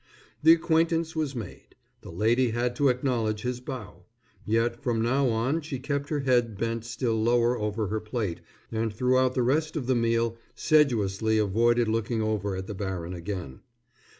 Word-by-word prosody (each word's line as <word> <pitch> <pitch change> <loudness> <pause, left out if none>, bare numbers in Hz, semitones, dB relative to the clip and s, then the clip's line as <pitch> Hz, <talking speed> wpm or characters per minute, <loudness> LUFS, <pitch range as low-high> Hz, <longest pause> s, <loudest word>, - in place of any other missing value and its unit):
The 160 +2 +7
acquaintance 165 0 +2
was 150 -4 -2
made. 110 -6 -8 0.3
The - - -11
lady 115 +8 +2
had 120 +2 -1
to 140 -1 +4
acknowledge 120 -4 0
his 125 0 -2
bow. 125 -6 -8 0.4
Yet 115 +5 +1
from 120 -4 0
now 130 +3 +2
on 120 +8 0
she 150 -3 -5
kept 140 +2 -3
her 150 -2 -1
head 120 -5 +1
bent 115 +1 -2
still 115 -1 -1
lower 120 +1 +3
over 105 0 -2
her 110 +1 -1
plate 110 -5 -3 0.3
and 110 0 -1
throughout 130 +3 +2
the 125 - +2
rest 155 +6 +1
of 140 - -3
the 130 - +2
meal 115 -1 +1 0.2
sedulously 110 - +2
avoided 115 +3 +2
looking 115 +1 -1
over 105 -2 -1
at 95 0 -5
the 105 - -6
baron 95 -3 -4
again. 85 -5 -6
120 Hz, 170 wpm, -27 LUFS, 110-130 Hz, 0.4 s, The